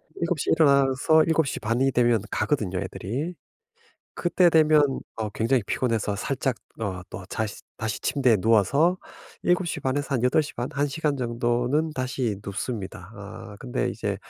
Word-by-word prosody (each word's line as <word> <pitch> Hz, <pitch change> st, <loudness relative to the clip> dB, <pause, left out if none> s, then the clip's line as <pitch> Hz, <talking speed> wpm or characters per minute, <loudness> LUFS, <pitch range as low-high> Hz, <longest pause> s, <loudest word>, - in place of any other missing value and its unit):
7:00 170 Hz, -3 st, -1 dB
에 -, -, +3 dB
일어나서 140 Hz, +1 st, +4 dB
7:30 135 Hz, -7 st, 0 dB
이 135 Hz, 0 st, +3 dB
되면 120 Hz, -4 st, +3 dB
가거든요 100 Hz, -, 0 dB
애들이. 125 Hz, -, -4 dB, 0.8 s
그때 175 Hz, 0 st, +3 dB
되면 155 Hz, -4 st, +4 dB, 0.2 s
어 110 Hz, -1 st, -2 dB
굉장히 115 Hz, +3 st, +1 dB
피곤해서 115 Hz, -5 st, -1 dB
살짝 130 Hz, +2 st, -1 dB, 0.2 s
어 95 Hz, -4 st, -3 dB
또 95 Hz, -, -7 dB
자시 110 Hz, -2 st, -4 dB
다시 110 Hz, -1 st, -3 dB
침대에 125 Hz, -6 st, +3 dB
누워서 115 Hz, -, +3 dB, 0.4 s
7:30 170 Hz, -7 st, 0 dB
에서 145 Hz, -1 st, -2 dB
한 120 Hz, -, 0 dB
8:30 125 Hz, -2 st, +1 dB
1 145 Hz, +1 st, +1 dB
시간 145 Hz, 0 st, -1 dB
정도는 120 Hz, +5 st, 0 dB
다시 130 Hz, -4 st, -2 dB
눕습니다. 100 Hz, -2 st, -5 dB
아 105 Hz, +1 st, -9 dB
근데 -, -, -2 dB
이제 -, -, -3 dB
125 Hz, 250 characters per minute, -25 LUFS, 110-145 Hz, 0.8 s, 일어나서